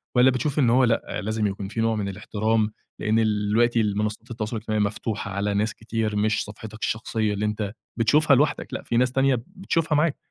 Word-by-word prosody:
والّا 125 +1 +6
بتشوف 140 +3 -1
إن 125 -5 +4
هو 125 +3 +5
لأ، 115 -6 0
لازم 110 +1 0
يكون 100 0 -4
في 110 +3 -3
نوع 115 0 +2
من 100 -2 -2
الاحترام، 105 +2 0 0.3
لإن 110 +1 +2
الوقتي 110 +2 +2
ال 105 -2 0
منصّات 105 +3 -3
التواصل 115 0 -3
الاجتماعي 110 -1 -1
مفتوحة 100 0 -3
على 100 +2 -1
ناس 105 +2 0
كتير، 110 -1 -2
مش 105 +1 +1
صفحتك 110 +1 -10
الشخصية 110 -1 -1
اللي 105 +1 -1
أنت 105 -1 -2 0.2
بتشوفها 145 +5 +4
لوحدك، 145 +3 +1
لأ، - - -4
في 120 - -1
ناس 125 +1 +3
تانية 135 0 +3 0.2
بتشوفها 165 -5 0
معاك، 150 0 +2
110 Hz, 200 wpm, -24 LUFS, 105-120 Hz, 0.3 s, والّا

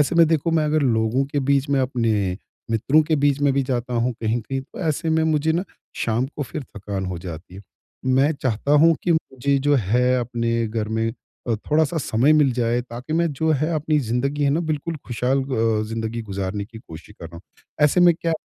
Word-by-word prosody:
ऐसे 145 +4 +2
में 165 -1 +7
देखो 165 0 +1
मैं 155 - +1
अगर 150 0 +1
लोगों 115 +1 +1
के 145 - +1
बीच 140 0 +2
में 140 - +2
अपने 110 -7 0 0.3
मित्रों 130 +8 +3
के 155 0 0
बीच 145 -1 +2
में 145 -1 +3
भी 135 0 +1
जाता 125 -1 -2
हूँ 120 +1 +1
कहीं-कहीं 120 +4 -1
तो 130 - -13
ऐसे 160 +2 -1
में 160 0 +2
मुझे 155 0 +1
ना 175 +4 -1 0.3
शाम 120 +3 0
को 145 - -2
फिर 140 +3 -6
थकान 100 -1 -4
हो 90 -2 -4
जाती 85 +1 -9
है। 95 - -10 0.4
मैं 130 +3 +3
चाहता 130 +3 0
हूँ 165 0 +6
कि 175 - +2
मुझे 140 -3 0
जो 145 - +4
है 125 +3 +2
अपने 115 -1 -1
घर 110 -1 -3
में 110 0 -1 0.4
अ, 115 - +2
थोड़ा-सा 155 +7 0
समय 130 +1 +2
मिल 150 -4 +4
जाए 120 0 0
ताकि 125 +4 -8
मैं 170 +1 +2
जो 160 +3 0
है 155 +4 0
अपनी 155 0 +1
ज़िंदगी 140 +3 -1
है 140 - +3
ना 155 +4 +1
बिल्कुल 155 +2 -3
खुशहाल 125 +3 0
अ, 115 -5 0
ज़िंदगी 115 +1 -3
गुज़ारने 100 -1 -4
की 110 +2 -12
कोशिश 85 0 -13
कर 85 - -6
रहा 85 +1 -12
हूँ। 85 - -12 0.4
ऐसे 150 +5 +3
में 175 -1 +6
क्या 165 0 -2
130 Hz, 215 wpm, -22 LUFS, 115-150 Hz, 0.4 s, में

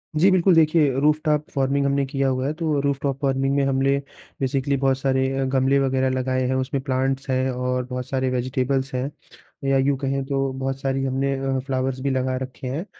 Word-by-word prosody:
जी 175 +6 +5
बिल्कुल। 185 -1 +4
देखिए, 155 -3 +4
rooftop 150 0 +1
farming 140 +1 +1
हमने 140 0 +1
किया 135 0 -1
हुआ 130 0 -1
है 150 - -1
तो 165 - -2
वो 150 -2 +1
रूफटॉप 140 -1 -1
फ़ार्मिंग 135 0 +1
में 140 - +2
हमने 135 +1 +2 0.4
बेसिकली 135 +1 0
बहुत 135 0 +2
सारे 130 -1 +1
अ, 135 - +1
गमले 135 +1 +2
वग़ैरह 130 -1 +1
लगाएँ 130 0 0
हैं 130 - 0
उसमें 130 +1 -1
प्लांट्स 135 0 -1
हैं 130 0 +1
और 125 0 -2
बहुत 125 0 -5
सारे 130 -1 0
वेज़िटेबल्स 130 +2 -1
हैं 130 +2 -1 0.6
या 135 - +4
यूँ 135 +1 +2
कहें 135 0 -1
तो 135 -1 -1
बहुत 135 0 -2
सारी 135 0 -1
हमने 135 +1 0
अ, 135 -1 -1
फ्लावर्स 130 -1 -1
भी 140 - -1
लगा 130 -1 0
रखे 130 0 -6
हैं 150 +8 -3
135 Hz, 205 wpm, -23 LUFS, 130-140 Hz, 0.6 s, जी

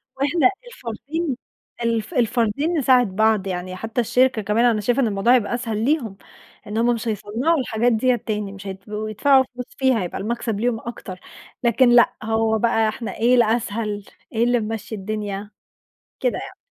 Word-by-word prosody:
وإحنا 285 +3 +3 0.2
الفردين 280 - -4 0.5
الف 230 +5 -1
الفردين 245 +6 +1
نساعد 250 -8 +3
بعض، 215 -2 +2
يعني 185 0 -4
حتى 225 +5 -2
الشركة 245 +1 +2
كمان 210 +4 +2
أنا 220 -3 +3
شايفة 245 +6 +1
إن 235 - +2
الموضوع 205 +4 +3
هيبقى 235 -2 0
أسهل 225 -3 -2
ليهم، 245 -9 0 0.5
إن 210 - -4
هُم 240 +1 +3
مش 230 +1 -5
هيصنعوا 230 - 0
الحاجات 245 -1 +1
ديّة 245 +2 +2
تاني، 210 -3 -4
مش 200 0 -10
هيبقوا 210 +3 -5
يدفعوا 265 +5 +4
فلوس 250 -1 -5
فيها، 260 -5 +2
هيبقى 175 - -5
المكسب 225 -1 -2
ليهم 235 -1 0
أكتر. 205 -6 -8 0.4
لكن 240 +1 +4
لأ 240 0 +6
هو 220 0 +1
بَقى 225 -1 +2
إحنا 225 +1 -5
إيه 240 +3 +4
الأسهل؟ 220 -3 0 0.3
إيه 230 +1 +2
اللي 245 0 +3
ممشي 220 0 -4
الدنيا؟ 205 0 -4 0.7
كده - - 0
يعني. - - -10
225 Hz, 165 wpm, -22 LUFS, 210-245 Hz, 0.7 s, لأ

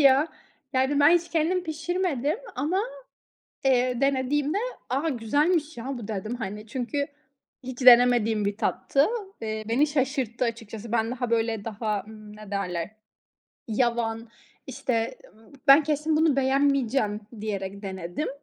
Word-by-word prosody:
ya! 275 +2 +5 0.4
Yani 265 +2 +2
ben 290 +2 +7
hiç 345 0 -12
kendim 340 +3 +1
pişirmedim 325 - -1 0.2
ama, 310 +9 0 0.8
eee, 250 -2 +2
denediğimde, 280 +4 +1 0.3
"A, 275 +6 0
güzelmiş 300 +6 +1
ya 235 +1 -7
bu," 225 -3 -8
dedim, 215 +2 -3
hani, 210 -2 -6
çünkü 260 +5 -2 0.6
hiç 255 0 -7
denemediğim 240 -3 +6
bir 200 0 -1
tattı. 275 +6 +1 0.3
Eee, 220 -1 -4
beni 255 +7 +3
şaşırttı 265 -4 -1
açıkçası. 225 -1 -5
Ben 225 -1 +1
daha 245 -1 -3
böyle 225 -2 0
daha, 215 -1 -2
ımm, 215 -1 -12
ne 215 -2 -11
derler? 180 -3 -2 0.8
Yavan, 230 0 0 0.4
işte, 235 +1 -2 0.2
ımm, 220 +3 -21
"Ben 275 +3 +8
kesin 305 +1 0
bunu 310 -3 +3
beğenmeyeceğim," 265 -5 +2 0.2
diyerek 200 -2 -4
denedim 190 - -4
245 Hz, 130 wpm, -26 LUFS, 220-285 Hz, 0.8 s, Ben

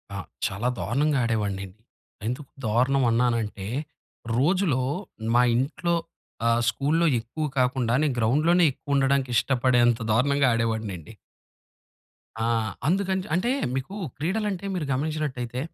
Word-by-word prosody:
ఆ! - - -3 0.3
చాలా 100 +6 -3
దారుణంగా 140 +5 +1
ఆడేవాడినండి. 100 -4 -2 0.5
ఎందుకు 130 +4 -4 0.2
దారుణం 130 +5 +2
అన్నానంటే, 115 -4 0 0.7
రోజులో 155 -1 +2 0.5
మా 125 - +6
ఇంట్లో, 170 +8 0 0.5
ఆహ్, 115 0 +3
స్కూలులో 155 +6 +1
ఎక్కువ 120 +7 -4
కాకుండా, 125 -2 +1
నేను 140 -5 +1
గ్రౌండ్‌లోనే 155 +10 +3
ఎక్కువుండడానికి 135 -2 +1
ఇష్టపడేంత 120 -2 +3
దారుణంగా 140 +3 +3
ఆడేవాడినండి. 110 -7 -2 1.3
ఆ! - - +1 0.4
అందుకని 190 +2 +1
చ్ - - -11
అంటే, 200 +7 +1 0.3
మీకు 135 +10 -4 0.2
క్రీడలంటే 195 +4 -2
మీరు 165 -5 -2
గమనించినట్టయితే 130 -4 -2
130 Hz, 105 wpm, -25 LUFS, 115-155 Hz, 1.3 s, మా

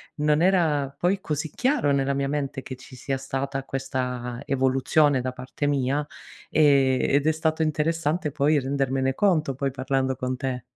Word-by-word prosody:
non 150 +1 +2
era 165 -7 +2
poi 180 +6 +1
così 155 0 -3
chiaro 255 - +1
nella 140 0 +1
mia 140 0 -1
mente 140 -2 -3
che 130 - -7
ci 130 +1 -14
sia 135 +2 -3
stata 135 0 -3
questa 125 -3 -4
evoluzione 135 +1 +2
da 130 +1 -3
parte 130 +3 -4
mia, 140 +1 0 0.4
ehm, 140 -4 +4
ed 140 +2 +2
è - - +5
stato 160 0 -1
interessante 155 +1 0
poi 150 +1 +2
rendermene 135 -1 0
conto, 155 -5 +2
poi 135 +1 -2
parlando 130 0 -1
con 130 0 -3
te 130 -2 -3
140 Hz, 160 wpm, -25 LUFS, 130-150 Hz, 0.4 s, è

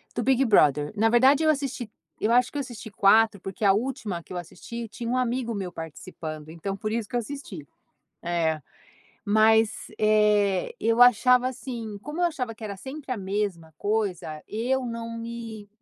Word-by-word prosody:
do - - -1
Big 265 0 +3
Brother. 150 - +4
Na 225 +2 +4
verdade, 265 +6 +5
eu 315 - +4
assisti 270 -5 -3 0.3
eu 220 - +1
acho 245 +1 +4
que 290 - -5
eu - - 0
assisti 235 -5 -8
4, 205 +1 +4
porque 195 +3 -7
a 195 - +6
última 215 -6 -3
que - - -11
eu - - -4
assisti 225 +7 -7
tinha 235 +2 -7
um 255 - +1
amigo 245 -1 -1
meu 195 -4 -4
participando, 155 -1 -8
então, 170 +5 -4
por 215 +2 -3
isso, 225 -1 -2
que - - -5
eu - - +3
assisti. 220 - -7 0.6
É. 165 -2 0 0.7
Mas, 220 +1 +5 0.3
eh, 210 -3 +3
eu 230 +2 +4
achava, 250 +1 +5
assim, 235 -4 -6
como 300 +5 -5
eu - - +3
achava 260 -9 -2
que 220 - -10
era 200 -2 -5
sempre 265 +5 -7
a - - -2
mesma 190 -5 -3
coisa, 200 -7 -2
eu 250 +4 -1
não 230 0 -5
me 230 -3 -7
220 Hz, 180 wpm, -26 LUFS, 195-245 Hz, 0.7 s, a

